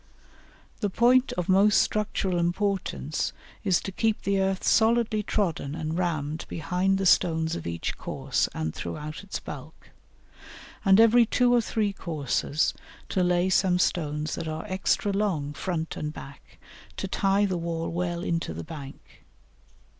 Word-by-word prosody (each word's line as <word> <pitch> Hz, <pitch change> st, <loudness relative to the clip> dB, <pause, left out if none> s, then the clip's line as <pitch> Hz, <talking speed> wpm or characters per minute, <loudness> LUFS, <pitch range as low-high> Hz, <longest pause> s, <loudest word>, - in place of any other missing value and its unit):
The 205 Hz, -, 0 dB
point 250 Hz, +6 st, +4 dB
of 180 Hz, -1 st, -3 dB
most 195 Hz, +3 st, +5 dB
structural 200 Hz, -4 st, 0 dB
importance 175 Hz, -3 st, -1 dB, 0.3 s
is 190 Hz, -4 st, +3 dB
to 195 Hz, -, -5 dB
keep 220 Hz, +3 st, 0 dB
the 200 Hz, 0 st, +1 dB
earth 190 Hz, 0 st, 0 dB
solidly 225 Hz, -1 st, +3 dB
trodden 170 Hz, -9 st, -1 dB
and 160 Hz, 0 st, -3 dB
rammed 155 Hz, -3 st, -2 dB
behind 180 Hz, +4 st, 0 dB
the 195 Hz, -, -1 dB
stones 160 Hz, -2 st, +3 dB
of -, -, -6 dB
each 85 Hz, 0 st, -3 dB
course -, -, -1 dB
and 80 Hz, 0 st, -3 dB
throughout 150 Hz, -, -6 dB
its 200 Hz, -, -5 dB
bulk, -, -, -10 dB, 0.9 s
and 195 Hz, 0 st, +6 dB
every 230 Hz, +1 st, +6 dB
two 245 Hz, +1 st, +3 dB
or 240 Hz, -, +5 dB
three 215 Hz, -2 st, -1 dB
courses 155 Hz, -3 st, -1 dB, 0.4 s
to 185 Hz, -, 0 dB
lay 180 Hz, 0 st, +2 dB
some 185 Hz, -1 st, +3 dB
stones 155 Hz, -3 st, 0 dB
that 165 Hz, -, -4 dB
are 155 Hz, 0 st, -4 dB
extra 190 Hz, +2 st, 0 dB
long 185 Hz, -8 st, -1 dB
front 165 Hz, 0 st, -3 dB
and 150 Hz, 0 st, -4 dB
back, 140 Hz, -2 st, -12 dB, 0.4 s
to -, -, -3 dB
tie 195 Hz, +1 st, +2 dB
the 190 Hz, -2 st, -1 dB
wall 165 Hz, -1 st, -3 dB
well 175 Hz, 0 st, -2 dB
into 165 Hz, -, -2 dB
the 85 Hz, -, -5 dB
bank. 140 Hz, -, -11 dB
180 Hz, 150 wpm, -27 LUFS, 160-200 Hz, 0.9 s, and